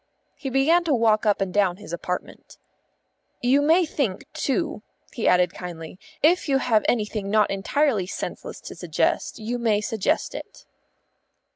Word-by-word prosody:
He 270 - -5
began 290 +7 +3
to 300 -5 +2
walk 220 -2 +2
up 205 -1 +2
and 190 -2 -1
down 195 -3 +2
his 205 -4 -10
apartment. 180 +1 -5 0.8
"You 260 +4 +3
may 330 +5 +4
think, 260 -11 -2
too," 300 - -1 0.3
he 235 - -1
added 180 0 +4
kindly. 175 -1 -8 0.2
"If 335 0 +3
you 270 - +4
have 230 -5 +2
anything 210 -3 -1
not 215 0 +3
entirely 210 +1 +1
senseless - - -6
to - - -8
suggest, - - -1
you 235 +3 -3
may 220 -3 +2
suggest 220 +7 -1
it." - - -9
220 Hz, 150 wpm, -24 LUFS, 195-275 Hz, 0.8 s, may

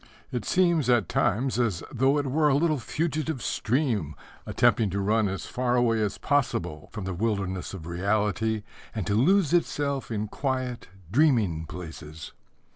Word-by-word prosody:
It 120 -5 -3
seems 170 -7 +2
at 120 -7 +3
times 120 +6 +1
as 105 -9 0
though 135 +3 +2
it 145 - 0
were 150 +3 +2
a 135 - +3
little 155 -1 +2
fugitive 155 +1 -2
stream 110 - 0 0.3
attempting 110 -3 +3
to 100 +2 -2
run 105 +2 +2
as 95 -1 -4
far 125 -1 -1
away 115 -2 +2
as 105 -2 -1
possible 90 - -1
from 110 - -6
the 95 - -3
wilderness 95 -2 -2
of 85 -4 -9
reality 105 +4 0 0.3
and 105 -5 -2
to 100 - 0
lose 165 - +3
itself 145 -5 0
in 110 -2 -2
quiet, 130 0 -3 0.2
dreaming 110 - +2
places. 80 -2 -9
115 Hz, 155 wpm, -27 LUFS, 100-140 Hz, 0.3 s, at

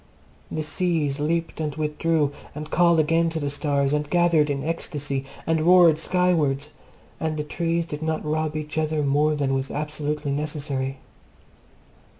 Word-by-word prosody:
The 155 - -3
seas 155 -3 0
leaped 165 +3 -1
and 150 -2 -2
withdrew, 155 -1 0 0.2
and 150 +1 -7
called 170 -2 +4
again 165 +2 +3
to 165 0 -3
the 145 -2 -2
stars, 140 -1 0
and 150 0 -1
gathered 170 -3 +3
in 140 -1 -1
ecstasy 145 -4 -3 0.2
and 160 -1 +1
roared 170 -2 +6
skywards, 160 -5 +1 0.5
and 155 -1 -2
the 150 - -1
trees 170 +2 -1
did 150 -2 -6
not 160 0 -2
rob 155 0 -1
each 155 0 -3
other 155 -1 0
more 150 +2 +2
than 140 -2 0
was 135 0 -1
absolutely 150 -1 -3
necessary. 140 -2 -3
150 Hz, 155 wpm, -24 LUFS, 145-165 Hz, 0.5 s, roared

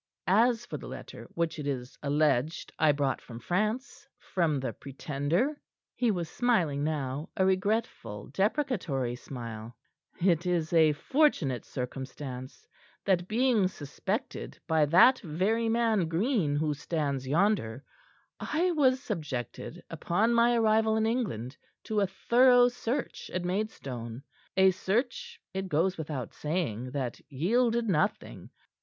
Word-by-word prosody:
"As 230 +5 +3
for - - -5
the - - -9
letter - - -9
which 170 -1 -1
it 145 - -4
is 130 -2 -4
alleged 150 +1 +1
I 155 -1 +5
brought 140 -2 0
from 115 - -10
France 215 - -2
from 160 -6 0
the 130 -3 -3
Pretender," 145 - -2 0.3
he 245 - +1
was 175 -5 -1
smiling 170 - +1
now, 145 0 -2
a 190 - +3
regretful, 190 - -1
deprecatory 190 - 0
smile, 115 -3 -8 0.4
"it 175 -1 +2
is 170 -2 0
a 160 -2 +5
fortunate 155 - +1
circumstance 130 0 -6 0.4
that, 180 -2 +2
being 225 -3 +3
suspected 190 - -5
by 160 -2 +3
that 185 - +6
very 205 +7 0
man 225 -6 +2
Green, 170 - +1
who 150 0 +1
stands 145 -3 -2
yonder, 145 - +1 0.6
I 350 +4 0
was 270 -4 +3
subjected, 135 - -5
upon 215 +7 +1
my 235 +1 +4
arrival 220 -1 +3
in 220 - +2
England, 170 - -2 0.3
to 215 -1 -1
a 200 - +2
thorough 245 +5 +5
search 245 +1 -4
at 180 -1 -1
Maidstone 135 - -4 0.3
a 190 0 +6
search, 260 - -2
it 190 0 -3
goes 180 +4 +2
without 150 -6 -5
saying, 150 - -2
that 130 -3 -4
yielded 230 - +1
nothing. 160 -6 -1
175 Hz, 130 wpm, -29 LUFS, 140-225 Hz, 0.6 s, that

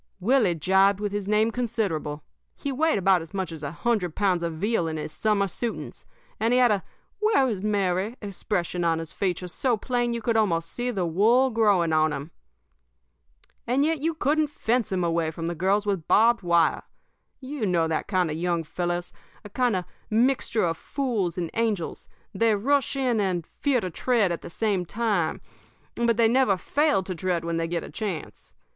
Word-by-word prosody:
"Willie 215 -3 +3
jibed 190 +4 +3
with 205 -1 -2
his 205 -1 -3
name 215 +2 +2
considerable. 195 -11 -2 0.3
He 280 - -4
weighed 315 0 +2
about 190 -2 +3
as 165 +4 -10
much 190 -3 -2
as 160 -2 -8
a 145 - -3
hundred 180 0 -1
pounds 190 -4 +1
of 170 -1 -2
veal 195 0 0
in 160 0 -3
his 155 - -5
summer 210 +2 +1
suitings, 230 +5 -5 0.3
and 225 +2 +1
he - - +4
had 245 -3 +5
a 200 -3 0 0.4
'Where 425 -11 +3
is 210 -6 -2
Mary?' 200 +2 0
expression 180 -3 -3
on 165 -1 +2
his 165 -1 -6
features 180 -2 -2
so 250 -4 +1
plain 240 +2 -1
that 235 - -1
you 235 - -4
could 230 0 +1
almost 170 -7 +1
see 245 +1 -3
the 195 -7 -1
wool 225 +10 +3
growing 200 -8 +3
on 155 0 +3
him. 145 +4 -6 1.4
"And 265 +4 +2
yet 320 -1 0
you 320 +3 -1
couldn't 305 0 +1
fence 240 -6 -1
him 185 -2 0
away 165 -1 0
from 165 +1 -6
the 170 - -1
girls 195 +5 +1
with 195 -6 -2
barbed 230 +1 +4
wire. 170 -3 +2 0.6
You 260 -4 -4
know 170 -3 +2
that 160 -1 -2
kind 180 -5 +1
of 155 - -3
young 170 -1 0
fellows 175 +2 -3 0.3
a 205 - -10
kind 245 -2 +1
of 180 -1 -2 0.2
a - - -6
mixture 235 -3 +2
of 165 -1 -1
fools 225 - -2
and 170 -2 -3
angels 220 -7 -2 0.2
they 220 +2 +3
rush 275 +7 +1
in 255 -4 +1
and 185 -5 -1
fear 275 +4 0
to 185 -4 -4
tread 220 0 +1
at 170 - -3
the - - -8
same 200 0 0
time; 200 -4 -1 0.5
but 235 -1 +1
they 230 -1 +5
never 235 -4 +3
fail 285 - +1
to 185 - -4
tread 175 -1 -2
when 170 0 -1
they 165 0 -1
get 170 0 -2
the - - -9
chance. 195 -8 -6
200 Hz, 200 wpm, -25 LUFS, 170-235 Hz, 1.4 s, had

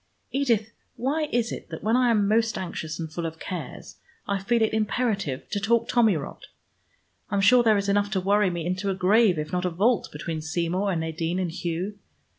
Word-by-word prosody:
Edith, 235 -6 +1 0.2
why 295 +4 -1
is 235 -1 0
it - - -7
that - - -7
when 220 +2 +2
I 250 -1 +4
am 210 -3 +3
most 225 +1 +2
anxious 170 -4 -5
and 160 -1 -5
full 170 0 -2
of 160 0 -8
cares, 165 -5 -7 0.3
I 200 -1 0
feel 230 +3 +2
it 220 - 0
imperative 215 - -1
to 205 - 0
talk 225 +3 +2
tommy 225 -7 +3
rot? 140 - -8 0.8
I'm 200 - 0
sure 240 +5 +6
there 220 -3 +4
is 200 0 -1
enough 205 0 +2
to 190 - +1
worry 200 +1 +3
me 170 -2 -4
into 185 +3 -1
a 190 - 0
grave 190 0 +4
if 155 0 -4
not 180 0 -1
a 180 - +1
vault, 205 +6 +1
between 155 +1 -4
Seymour 175 +5 -1
and 170 -3 -1
Nadine 160 +2 -2
and 180 -3 -1
Hugh. 180 +3 -4
200 Hz, 210 wpm, -25 LUFS, 170-220 Hz, 0.8 s, sure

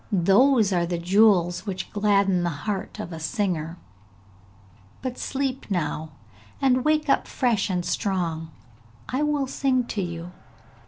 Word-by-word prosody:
Those 205 +4 +4
are 170 -1 +1
the 175 0 -2
jewels 180 0 +3
which 185 -2 -4
gladden 200 -3 +2
the 175 - 0 0.2
heart 205 -2 -3
of 180 -5 -6
a 160 - -6
singer; 170 -3 -2 1.3
but 255 -1 -4
sleep 270 -2 -3
now, 160 -4 -2 0.5
and 255 -2 +3
wake 305 +1 +2
up - - +2
fresh 230 -6 0
and 180 -2 -1
strong! 170 -5 -2 0.6
I 260 +3 -1
will 295 -2 +1
sing 260 -1 +1
to 205 - -2
you!' 170 -1 -5
195 Hz, 140 wpm, -25 LUFS, 175-250 Hz, 1.3 s, Those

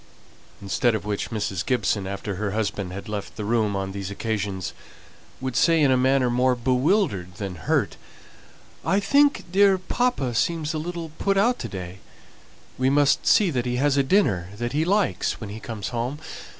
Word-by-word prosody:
Instead 110 +4 +1
of 105 -2 -4
which 105 -1 -2
Mrs. 100 -5 -2
Gibson, 105 -5 0
after 100 +1 -4
her 100 -1 -2
husband 100 -3 -2
had 100 +4 -7
left 105 -2 -5
the 105 - -5
room, 110 -2 +1
on 95 0 -3
these 95 -1 -5
occasions 100 -3 -3 0.7
would 130 -2 -4
say 165 -2 +4
in 145 -3 +4
a - - +5
manner 130 0 +3
more 125 +1 +2
bewildered 125 - +1
than 100 -1 -5
hurt 80 -4 -1 0.9
"I 195 - +2
think 280 +8 +3
dear 195 0 +5
papa 185 - -1
seems 160 +5 0
a 155 - -2
little 170 0 -5
put 195 -1 +1
out 240 +5 +3
to - - -4
day; 90 0 -7 0.8
we 130 +1 +3
must 140 0 +3
see 200 -5 +5
that 125 -3 -1
he 125 - -1
has 140 +2 +2
a 140 - +4
dinner 130 - +2
that 120 +2 -3
he 155 +2 +1
likes 200 +2 +1
when 105 -3 -7
he 110 - -7
comes 110 -2 -5
home. 120 +4 -3
125 Hz, 180 wpm, -24 LUFS, 100-160 Hz, 0.9 s, a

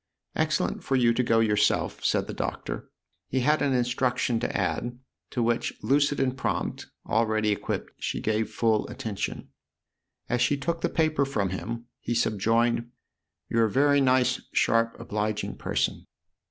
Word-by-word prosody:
" - - -45
Excellent - - -1
for 135 - 0
you 120 -2 +4
to 125 - +1
go 115 -2 +3
yourself/' 105 -1 +1
said - - +2
the - - -6
Doctor. - - -4 0.4
He 130 - 0
had 150 +4 +3
an 140 - +2
instruction 125 -1 +1
to - - -2
add, 120 0 -1 0.3
to 120 - -1
which, 115 +1 0
lucid 140 +5 +2
and 130 -1 +1
prompt, - - -2 0.2
already 110 -1 +2
equipped, 100 - -3
she - - -2
gave 110 0 0
full 110 -2 +1
attention. 105 -2 -4 0.8
As 120 0 0
she 140 +4 +3
took 165 +4 -2
the - - +1
paper 155 -3 +2
from 105 -9 -1
him 115 +5 -4
he 120 - -2
subjoined: 115 +2 +1 0.3
" 80 -2 -59
You're 115 -1 +3
a - - 0
very 145 +2 +4
nice, 130 -1 +3
sharp, 115 0 +2
obliging 105 -2 -2
person." - - -1
120 Hz, 160 wpm, -27 LUFS, 110-130 Hz, 0.8 s, you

